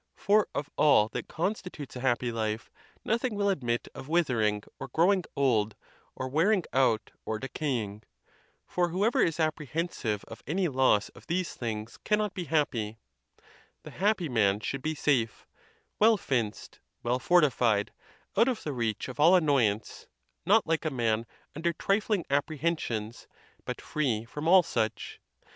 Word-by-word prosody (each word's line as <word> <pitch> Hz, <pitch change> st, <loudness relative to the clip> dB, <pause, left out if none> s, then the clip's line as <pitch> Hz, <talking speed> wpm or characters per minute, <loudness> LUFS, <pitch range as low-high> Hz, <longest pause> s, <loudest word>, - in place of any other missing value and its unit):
for 210 Hz, +1 st, +3 dB
of 145 Hz, -, -2 dB
all 110 Hz, -8 st, +5 dB
that -, -, -5 dB
constitutes 180 Hz, -5 st, -4 dB
a -, -, -5 dB
happy 125 Hz, -1 st, 0 dB
life, 110 Hz, -1 st, -3 dB, 0.3 s
noth 230 Hz, +2 st, 0 dB
ing 250 Hz, -4 st, -1 dB
will 200 Hz, 0 st, +1 dB
admit 120 Hz, -10 st, -1 dB
of -, -, -9 dB
withering, 115 Hz, -11 st, +1 dB, 0.2 s
or 135 Hz, -, -5 dB
growing 180 Hz, +8 st, +3 dB
old, 110 Hz, -7 st, +2 dB, 0.4 s
or 130 Hz, -, -4 dB
wearing 175 Hz, +8 st, +2 dB
out, 120 Hz, -5 st, +2 dB
or 110 Hz, -, -2 dB
decaying; 120 Hz, -5 st, -3 dB, 0.6 s
for 175 Hz, -1 st, 0 dB
whoever 200 Hz, +7 st, +2 dB
is 165 Hz, -2 st, +2 dB
apprehensivegf 150 Hz, -, -2 dB
any 180 Hz, +5 st, +1 dB
loss 130 Hz, -7 st, +2 dB
of -, -, -17 dB
these 180 Hz, +1 st, -1 dB
things 110 Hz, -1 st, -5 dB
cannot 210 Hz, -1 st, +1 dB
be 180 Hz, -3 st, -4 dB
happy: 115 Hz, -9 st, 0 dB, 0.9 s
the -, -, -9 dB
happy 200 Hz, -3 st, +1 dB
man 105 Hz, -6 st, +2 dB
should 135 Hz, +5 st, -4 dB
be 155 Hz, +2 st, -2 dB
safe, 125 Hz, -7 st, 0 dB, 0.5 s
well 220 Hz, +1 st, +6 dB
fenced, 120 Hz, -, -3 dB, 0.2 s
well 120 Hz, +2 st, 0 dB
fortified, 125 Hz, -, +3 dB, 0.4 s
out 230 Hz, +4 st, +5 dB
of 250 Hz, -4 st, -1 dB
the 150 Hz, -, -3 dB
reach 115 Hz, -4 st, -2 dB
of 130 Hz, +2 st, -9 dB
all 165 Hz, +5 st, +7 dB
annoyance, 130 Hz, -, +1 dB, 0.4 s
not 210 Hz, +3 st, +5 dB
like 165 Hz, -1 st, 0 dB
a 155 Hz, -, 0 dB
man 115 Hz, -4 st, 0 dB, 0.3 s
under 170 Hz, +3 st, 0 dB
trifling 200 Hz, +1 st, 0 dB
apprehensions, 140 Hz, -6 st, -2 dB, 0.4 s
but -, -, -4 dB
free 120 Hz, -8 st, -1 dB
from 150 Hz, +6 st, -5 dB
all 185 Hz, +1 st, +7 dB
such. 110 Hz, -8 st, -2 dB
140 Hz, 150 wpm, -29 LUFS, 115-175 Hz, 0.9 s, all